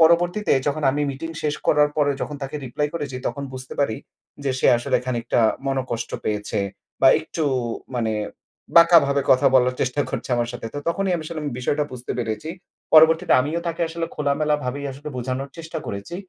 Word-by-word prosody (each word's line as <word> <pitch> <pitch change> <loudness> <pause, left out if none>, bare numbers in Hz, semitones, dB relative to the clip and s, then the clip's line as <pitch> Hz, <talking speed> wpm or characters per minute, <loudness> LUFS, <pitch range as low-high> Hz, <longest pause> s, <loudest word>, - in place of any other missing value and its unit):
পরবর্তীতে 175 +5 +4
যখন 150 +2 0
আমি 145 +2 -1
মিটিং 155 +5 -6
শেষ 150 -1 0
করার 150 0 +4
পরে 145 -2 +3
যখন 150 - -4
তাকে 135 +2 -4
রিপ্লাই 145 +4 -1
করেছি 145 -5 -4
তখন 140 - -3
বুঝতে 130 0 -8
পারি 125 -6 +1 0.5
যে 135 - +1
সে - - +2
আসলে 120 - +1
খানিকটা 120 -1 0 0.3
মনঃকষ্ট 130 -4 -2
পেয়েছে। 105 -1 -2 0.4
বা - - +7
একটু 160 - -4 0.5
মানে 115 -3 0 0.6
বাঁকা 170 0 +9
ভাবে 140 0 +1
কথা 130 +1 +5
বলার 125 -1 +4
চেষ্টা 130 +3 0
করছে 135 - -4
আমার 120 -1 0
সাথে। 120 -1 -6
তো - - -2
তখনই 190 +2 0
আমি 165 - -5
আসলে 160 -1 -5 0.2
বিষয়টা 145 +4 0
বুঝতে 125 -1 -5
পেরেছি। 110 +4 -3 0.5
পরবর্তীতে 160 +3 +6
আমিও 155 +6 -1
তাকে 165 0 -4
আসলে 165 0 -3
খোলামেলা 150 +1 +1
ভাবেই 140 +3 -3
আসলে 145 +3 -8
বুঝানোর 130 +2 -3
চেষ্টা 165 0 -5
করেছি, 100 +12 -6
140 Hz, 175 wpm, -23 LUFS, 125-160 Hz, 0.6 s, বাঁকা